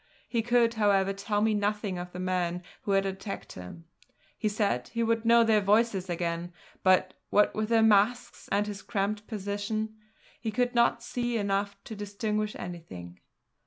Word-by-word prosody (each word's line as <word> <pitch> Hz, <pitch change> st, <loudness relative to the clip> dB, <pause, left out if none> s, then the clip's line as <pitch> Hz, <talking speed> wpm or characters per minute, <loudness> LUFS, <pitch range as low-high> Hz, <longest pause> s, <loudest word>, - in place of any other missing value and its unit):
He 235 Hz, -, 0 dB
could, 235 Hz, 0 st, +3 dB
however, 200 Hz, -3 st, +2 dB
tell 205 Hz, +1 st, -1 dB
me 220 Hz, 0 st, +3 dB
nothing 205 Hz, -2 st, -1 dB
of 180 Hz, 0 st, -6 dB
the 180 Hz, -, -7 dB
men 180 Hz, -1 st, -1 dB, 0.2 s
who 200 Hz, -, -1 dB
had 195 Hz, 0 st, +3 dB
attacked 195 Hz, +1 st, -5 dB
him. 90 Hz, -, -10 dB, 0.5 s
He 215 Hz, -, -1 dB
said 205 Hz, -, 0 dB
he 230 Hz, 0 st, -2 dB
would 230 Hz, 0 st, +1 dB
know 235 Hz, 0 st, +6 dB
their 220 Hz, -2 st, +4 dB
voices 200 Hz, -2 st, +2 dB
again, 170 Hz, 0 st, -2 dB, 0.3 s
but, 185 Hz, 0 st, +3 dB, 0.2 s
what 210 Hz, -, +4 dB
with 215 Hz, 0 st, -2 dB
their 225 Hz, -1 st, +4 dB
masks 220 Hz, +3 st, +2 dB
and 205 Hz, +1 st, +2 dB
his 205 Hz, -1 st, -6 dB
cramped 210 Hz, 0 st, -2 dB
position, 215 Hz, +1 st, -3 dB, 0.5 s
he 225 Hz, -, -3 dB
could 245 Hz, +3 st, 0 dB
not 235 Hz, 0 st, +3 dB
see 240 Hz, -1 st, -2 dB
enough 200 Hz, -1 st, -1 dB
to 220 Hz, -, -8 dB
distinguish 210 Hz, +1 st, -2 dB
anything. 90 Hz, -, -8 dB
205 Hz, 165 wpm, -29 LUFS, 190-220 Hz, 0.5 s, know